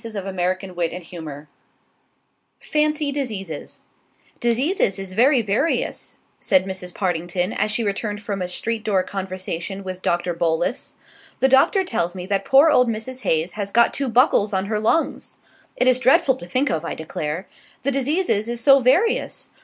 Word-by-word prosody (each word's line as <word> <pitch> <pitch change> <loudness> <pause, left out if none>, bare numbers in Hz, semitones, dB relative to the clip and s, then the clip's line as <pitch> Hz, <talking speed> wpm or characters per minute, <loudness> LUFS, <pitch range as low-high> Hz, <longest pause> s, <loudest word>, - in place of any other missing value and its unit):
SHILLABER 200 -4 -5
("Mrs. 185 +1 -2
Partington") 165 -4 -5 1.1
FANCY 300 -1 0
DISEASES 210 - -5 0.6
"Diseases 240 - +1
is 195 -1 -6
very 250 +4 +4
various," 220 +11 -1 0.2
said 190 -2 +2
Mrs. 190 -2 -6
Partington, 175 0 -1
as 215 - 0
she 220 +2 -1
returned 205 0 -2
from 205 -2 -4
a 180 - -1
street 220 +5 -3
door 200 -4 +1
conversation 190 0 -5
with 185 -1 -6
Doctor 175 0 0
Bolus. 170 +7 -1 0.4
"The 265 - +3
Doctor 270 +9 +4
tells 185 - -2
me 180 -1 -6
that 195 0 -1
poor 280 +4 +6
old 250 -4 +4
Mrs. 230 +4 -4
Haze 165 -4 0
has 205 -2 -4
got 235 +3 +3
two 275 -2 -2
buckles 230 -4 +3
on 190 0 0
her 210 +1 -1
lungs! 230 +10 -1 0.4
It 250 - +1
is 255 0 +4
dreadful 265 +3 +4
to 175 - -9
think 255 +10 +1
of, 160 - -1
I 170 - -4
declare. 160 +2 -5 0.4
The 280 - +1
diseases 275 - 0
is 240 0 -3
so 275 +3 +6
various! 285 - +1
205 Hz, 160 wpm, -22 LUFS, 185-255 Hz, 1.1 s, poor